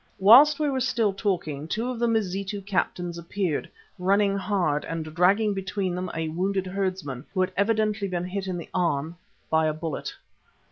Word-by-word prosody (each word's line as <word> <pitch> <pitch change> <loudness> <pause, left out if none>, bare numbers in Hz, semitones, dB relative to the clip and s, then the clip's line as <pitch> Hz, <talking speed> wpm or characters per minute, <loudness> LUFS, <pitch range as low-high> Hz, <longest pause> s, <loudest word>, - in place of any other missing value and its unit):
Whilst 270 +10 +7
we 300 - +1
were 270 -2 0
still 230 -5 +1
talking 170 -8 -2
two 225 +8 -2
of 245 - -6
the 235 - +2
Mazitu 200 -2 -1
captains 180 -3 -2
appeared, 170 -2 -2 0.3
running 200 +2 +2
hard 185 -7 0
and 165 -1 -4
dragging 200 +5 +3
between 190 -1 -2
them 180 0 -3
a 160 0 -2
wounded 190 +4 -1
herdsman, 185 -9 -3
who 185 - +2
had 185 +1 +1
evidently 215 0 +1
been 180 -2 -2
hit 190 +1 -4
in 185 -1 -2
the 170 - -8
arm 165 -3 0 0.4
by 160 0 +3
a 155 - 0
bullet. 155 -1 -4
190 Hz, 175 wpm, -26 LUFS, 170-205 Hz, 0.4 s, Whilst